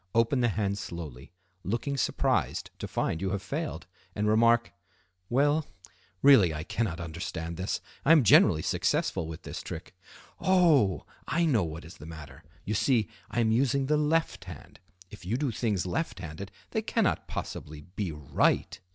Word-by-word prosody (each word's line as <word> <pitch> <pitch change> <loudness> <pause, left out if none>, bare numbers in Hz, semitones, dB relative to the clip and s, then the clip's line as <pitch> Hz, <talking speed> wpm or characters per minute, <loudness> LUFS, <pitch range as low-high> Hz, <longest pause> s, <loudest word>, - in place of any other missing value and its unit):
Open 115 +4 +3
the 120 - +3
hand 100 -2 -1
slowly, 75 -8 -7 0.3
looking 120 +8 -2
surprised 135 - 0
to - - -4
find 80 - -1
you 95 - 0
have 95 -1 -3
failed, 150 - -4 0.3
and 105 0 0
remark: 115 +2 +4 0.6
"Well—really 110 - +2
I 75 - -4
cannot 95 -2 -2
understand 85 0 -5
this. 95 +3 -2 0.2
I 140 - +4
am 160 -4 +7
generally 90 -6 +6
successful 80 - 0
with 80 -1 -8
this - - -6
trick. - - -8 0.5
Oh! 165 - +3 0.2
I 170 +1 +1
know 125 - +3
what 80 0 -6
is 80 - -12
the 75 - -11
matter. 80 -2 -10 0.2
You 105 - -1
see, 110 -2 +2 0.2
I 120 - 0
am 110 -1 +2
using 135 +3 +2
the 150 +3 +2
left 155 +2 0
hand; - - -11 0.3
if 105 - -11
you 105 +7 -1
do 140 -2 -1
things 105 -5 -1
left 160 - -2
handed 95 +3 -7 0.2
they - - 0
cannot - - 0
possibly 75 0 -6
be 90 +3 -4
right. 75 -3 0
105 Hz, 160 wpm, -29 LUFS, 85-135 Hz, 0.6 s, am